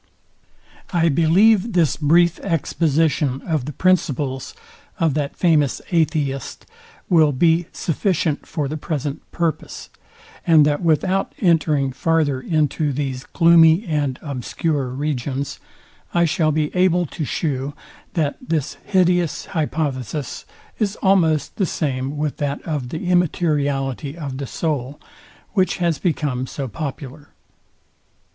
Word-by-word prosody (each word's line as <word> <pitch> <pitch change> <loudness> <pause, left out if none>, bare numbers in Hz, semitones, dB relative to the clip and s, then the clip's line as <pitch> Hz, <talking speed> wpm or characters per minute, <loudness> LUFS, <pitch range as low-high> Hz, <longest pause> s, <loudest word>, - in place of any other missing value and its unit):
I 170 -2 +3
believe 190 +8 +4
this 170 -5 +3
brief 170 +3 +3
exposition 155 -5 0
of 155 -6 -1
the 150 - -4
principles 145 -7 0 0.4
of 165 -4 +2
that 145 -1 -2
famous 155 -6 +2
atheist 150 -6 -1 0.4
will 160 -4 +4
be 165 +4 +2
sufficient 165 -2 -1
for 150 -3 -2
the 155 +3 -4
present 150 -2 -3
purpose, 165 -3 -3 0.5
and 160 -3 +5
that 145 0 +1
without 185 +4 +1
entering 155 -6 +2
farther 145 -1 +1
into 155 -1 0
these 135 -2 -3
gloomy 170 +2 +5
and 145 -6 -1
obscure 140 +1 -2
regions, 140 +1 -3 0.6
I 170 0 +4
shall 160 -1 +1
be 150 +1 -1
able 180 -1 +3
to 155 +1 -5
shew, 140 -1 -2 0.4
that 150 -4 0
this 165 - -2
hideous 180 -4 +1
hypothesis 150 - -3 0.3
is 210 -2 0
almost 170 -6 +2
the 195 -5 +1
same 135 -2 -2
with 150 -1 -2
that 145 -1 -2
of 145 -6 -3
the 160 +6 -5
immateriality 145 -5 0
of 140 -5 -5
the 140 - -4
soul, 145 -3 -3 0.5
which 185 -4 +1
has 170 -5 0
become 140 -6 -1
so 135 0 -5
popular. 145 +1 -7
155 Hz, 120 wpm, -21 LUFS, 140-170 Hz, 0.6 s, and